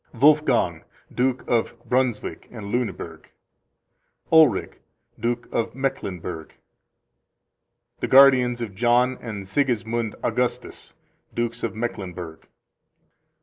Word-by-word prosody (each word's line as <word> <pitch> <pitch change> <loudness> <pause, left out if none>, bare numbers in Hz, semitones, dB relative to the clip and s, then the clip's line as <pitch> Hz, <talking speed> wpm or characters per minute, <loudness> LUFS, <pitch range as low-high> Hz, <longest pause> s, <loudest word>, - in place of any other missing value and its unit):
Wolfgang, 130 - +3 0.3
Duke 125 0 0
of 120 0 0
Brunswick 125 -4 -1
and 105 -4 -8
Lueneburg. 120 -2 -4 1.0
Ulrich, 155 -11 +4 0.4
Duke 120 +2 -2
of 115 - -2
Mecklenburg. 90 -11 -4 1.4
The - - -2
guardians 130 -3 +6
of 105 -4 -6
John 120 +4 +3
and 105 -5 -6
Sigismund 115 -2 -1
Augustus, - - -2 0.4
Dukes 120 0 -2
of 115 - -2
Mecklenburg. 90 -8 -5
120 Hz, 90 wpm, -24 LUFS, 105-125 Hz, 1.4 s, guardians